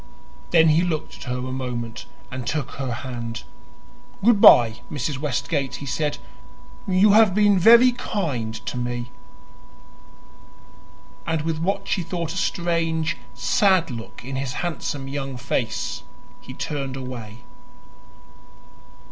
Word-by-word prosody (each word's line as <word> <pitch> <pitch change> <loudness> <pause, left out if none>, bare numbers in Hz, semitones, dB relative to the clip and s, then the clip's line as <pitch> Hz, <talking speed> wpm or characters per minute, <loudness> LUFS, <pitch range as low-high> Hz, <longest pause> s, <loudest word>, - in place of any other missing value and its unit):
Then 165 -2 +5
he 155 +2 +4
looked 170 -4 -3
at - - -10
her 125 0 -2
a 130 +1 -4
moment 120 -3 -5 0.2
and 125 -1 -5
took 150 -1 -2
her 135 -2 -4
hand. 120 -1 -5 0.8
"Goodbye, 125 - +7
Mrs. 140 -1 -3
Westgate," 140 0 -2
he 140 - -7
said. 150 +2 -1 0.7
"You 195 +2 +5
have 210 -3 +5
been 205 -2 +4
very 235 +6 +7
kind 150 - -3
to - - -4
me." 120 0 -3 2.2
And 160 -2 0
with 160 -1 -2
what 190 +5 -1
she 190 - 0
thought 170 -1 -4
a - - -6
strange, 165 -3 0 0.2
sad 185 -6 +2
look 115 +1 -8
in 135 +1 -4
his 135 -2 -3
handsome 145 -5 -4
young 135 -1 -4
face, 125 -1 -2 0.4
he - - -11
turned 135 -3 -4
away. 125 -3 -8
145 Hz, 125 wpm, -23 LUFS, 125-170 Hz, 2.2 s, Goodbye